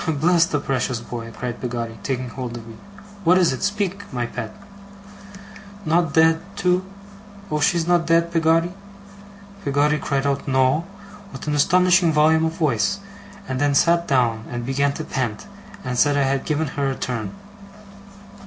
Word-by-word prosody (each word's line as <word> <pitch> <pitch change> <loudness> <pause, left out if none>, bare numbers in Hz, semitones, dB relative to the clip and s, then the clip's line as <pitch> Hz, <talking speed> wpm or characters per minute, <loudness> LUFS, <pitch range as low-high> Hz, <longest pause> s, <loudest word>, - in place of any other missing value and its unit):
'Bless 165 +3 +3
the 150 -3 -1
precious 130 -3 -1
boy!' 115 -1 -7
cried 120 +1 -6
Peggotty, 115 -2 -4
taking 130 -2 -3
hold 120 0 -6
of 115 - -10
me. 115 - -10 0.5
'What 180 +2 +5
is 175 -7 +3
it? - - -6
Speak, 200 -1 -2
my 120 -2 -2
pet!' - - -6 1.3
'Not 165 -1 +1
dead, 160 0 +5
too! 180 -2 +1 0.7
Oh, 150 - 0
she's 165 +3 +2
not 175 -1 +2
dead, 170 0 +3
Peggotty?' 165 +1 +2 0.9
Peggotty 145 +2 +2
cried 140 -1 -1
out 140 0 -1
No! 130 +4 +2 0.5
with - - -8
an 150 - -1
astonishing 180 +3 +4
volume 160 +1 +4
of 160 - -1
voice; 160 - +1 0.5
and 130 0 -3
then 145 -1 +2
sat 170 +3 +3
down, 115 -4 +1
and 120 -1 -4
began 140 +2 +1
to - - -5
pant, 120 -5 -3 0.4
and 125 -1 -2
said 145 -1 +4
I 140 - +3
had 135 0 0
given 155 -1 -1
her 140 0 -1
a 135 - -2
turn. 125 - -4
145 Hz, 160 wpm, -22 LUFS, 130-165 Hz, 1.3 s, What